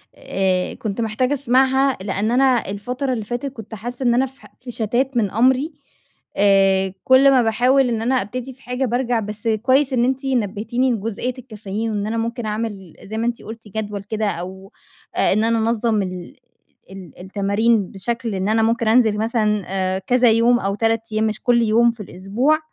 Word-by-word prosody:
آآ، 185 -1 -1
كنت 215 +1 -4
محتاجة 230 +5 0
أسمعها، 265 0 +2
لأن 200 +3 -1
أنا 255 -3 +2
الفترة 250 +7 -3
اللي 220 -4 -4
فاتت 240 +4 -4
كنت 225 -3 -9
حاسّة 240 +5 -6
إن 240 -1 +3
أنا 255 +3 +3
في 265 +1 -14
ح - - -16
في 250 0 -8
شَتَات 245 +4 -1
من 205 -5 +1
أمري، 260 +7 +2 0.7
آآ، 195 -1 +3
كل 265 +1 +6
ما 255 -2 +4
باحاول 250 +4 +3
إن 225 -2 -1
أنا 250 +3 +1
أبتدي 250 +6 -6
في 265 - -25
حاجة 250 +2 -2
بارجع. 245 0 0
بس 210 +1 -5
كويس 255 +5 +2
إن 240 -1 +2
أنتِ 265 +2 -1
نبّهتيني 240 +1 0
لجُزئية 225 +2 -3
الكافيين. 220 -2 -5
وإن 205 -1 -2
أنا 225 +1 -2
ممكن 230 +1 -3
أعمل 210 -5 -4
زي 215 +2 -6
ما 230 +1 0
أنتِ 240 -1 -3
قُلْتِ 225 0 -10
جدول 205 -1 -4
كده 215 +1 -3
أو 190 +2 -7 0.4
آآ، - - +3
إن 215 +2 +1
أنا 230 0 +2
أنظَّم 225 -1 +1
ال 180 -2 -6 0.6
ال 190 -5 -12
التمارين 200 +2 0
بشكل 230 +2 -3
إن 190 +2 -1
أنا 225 +1 +2
ممكن 230 0 +1
أنزل 220 -2 +4
مثلًا 215 -2 0
آآ، 190 0 -1
كذا 245 +3 +3
يوم، 235 +2 +4
أو 195 -2 -2
3 225 +1 +1
أيام 215 +1 +1
مش 215 -1 -4
كل 240 -1 +3
يوم 230 +1 +4
في 230 -2 -9
الأسبوع. 205 - 0
225 Hz, 185 wpm, -20 LUFS, 205-245 Hz, 0.7 s, كل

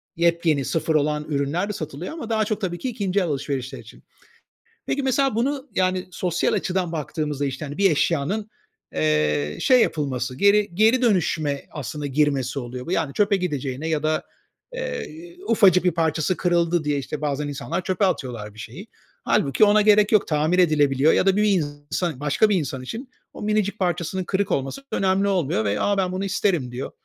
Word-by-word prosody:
yepyeni 170 -4 +2
sıfır 160 +2 0
olan 150 0 +1
ürünler 150 +6 -1
de - - -2
satılıyor 155 - -6
ama 310 -9 -7
daha 220 -1 +1
çok 215 +1 -2
tabii 175 -3 -2
ki 260 - -3
ikinci 200 -4 -1
el 185 - +1
alışverişler 135 -4 -3
için. - - -15 0.8
Peki 280 - -1
mesela 270 -2 +1
bunu, 275 +4 -1
yani 185 0 0
sosyal 175 -1 0
açıdan 180 -2 -1
baktığımızda, 150 -2 -3
işte, 135 +2 -4
hani, 145 0 -7
bir 195 -2 +4
eşyanın, 170 +8 0 0.4
eee, 75 -1 +1
şey 255 -2 +5
yapılması, 130 - -1
geri, 200 0 +3
geri, 225 +6 +4
dönüşme 160 - +1
aslında 145 +1 -5
girmesi 140 -2 0
oluyor 125 0 -7
bu. - - -5
Yani 160 -6 0
çöpe 205 -1 +2
gideceğine 145 -5 -3
ya 155 -2 -1
da, 155 0 0 0.5
eee, 350 -9 -6
ufacık 190 -5 +5
bir 180 - +3
parçası 165 +1 0
kırıldı 170 -1 +1
diye 145 -1 0
işte 150 +2 -6
bazen 145 0 -1
insanlar 145 +5 -4
çöpe 190 +2 +1
atıyorlar 120 - -3
bir 110 - -15
şeyi. - - -9 0.4
Hâlbuki 135 +8 +2
ona 210 0 +6
gerek 210 0 +5
yok, 215 -3 +4
tamir 155 +3 +1
edilebiliyor 150 -3 +4
ya - - +2
da 195 -1 +4
bir 210 - +2
insan 150 -4 -1
başka 150 +9 +2
bir 205 - +3
insan 140 -6 -2
için 230 - -7 0.2
o - - -10
minicik 210 0 0
parçasının 180 0 -1
kırık 195 +2 -1
olması 135 - -2
önemli 195 +1 +1
olmuyor 165 - 0
ve 100 0 0
a 205 -1 +1
ben 185 -2 0
bunu 185 +2 -2
isterim 180 -9 0
diyor. 125 +2 -5
170 Hz, 180 wpm, -23 LUFS, 145-200 Hz, 0.8 s, ona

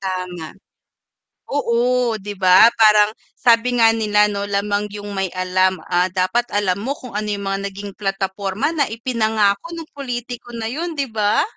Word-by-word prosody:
Tama, 180 -3 -5 0.9
oo 245 -2 +1
'Di 205 0 -7
ba, 185 +4 +7
parang 210 -1 +6 0.2
sabi 235 0 +3
nga 225 - +7
nila 210 -2 +2
'no, 200 -1 -3
lamang 205 +1 -1
'yung 205 0 -7
may 195 -2 -3
alam. 185 0 +1
Ah, 180 0 +2
dapat 195 +6 +1
alam 200 -3 +1
mo 240 +8 -3
kung 250 -7 -8
ano 215 - -2
'yung 205 -1 -2
mga 195 0 -1
naging 200 +1 -8
plataporma 195 +2 -2
na 315 -4 +1
ipinangako 220 +3 0
ng 330 -2 -8
pulitiko 245 -2 -6
na 225 -1 -4
'yun, 330 +7 -4
'di 280 -4 -3
ba? 210 -1 +1
210 Hz, 160 wpm, -20 LUFS, 195-235 Hz, 0.9 s, ba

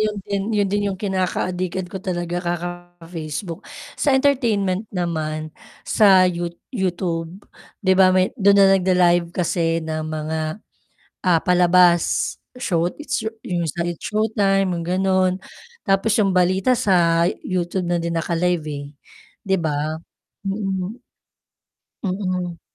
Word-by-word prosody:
'yon 215 -1 0
din 200 -1 -2
'yon 210 -2 +2
din 205 +1 0
'yong 195 - -3
kinaka-adikan 185 -1 -2
ko 190 - -5
talaga 175 -1 -3
kaka-Facebook, 175 -1 -5 0.4
sa 280 -3 +3
entertainment 225 -8 +1
naman 155 -4 -3 0.3
sa 195 -4 +5
yuo 175 -1 -1 0.2
YouTube, 175 -5 -2 0.5
'di 190 - +5
ba 190 0 +6
may 185 0 +2
do'n 200 0 +5
na 200 -1 +7
nag-la-live 175 -2 +3
kasi 165 -1 -1
ng 155 0 -3
mga, 155 0 -3 0.9
ah, 170 -3 +4
palabas 180 -1 +3 0.2
show 170 -7 +1 0.2
it's 245 -6 -3 0.2
it's 170 -1 -3
showtime 205 -3 +1
mga 170 - -4 0.2
ganun, 185 -1 +2 0.4
tapos 195 +2 +1
'yong 200 - +2
balita 185 +6 +2
sa 170 -5 +3 0.2
YouTube 180 0 -2
na 175 - +2
din 170 0 -2
naka-live, 170 0 0
eh, 145 -1 -5 0.6
'di 190 -3 +1
ba. 155 -1 -2 0.5
Mm. 195 -1 -2 1.1
Mm. 185 -3 -3
180 Hz, 120 wpm, -21 LUFS, 170-195 Hz, 1.1 s, na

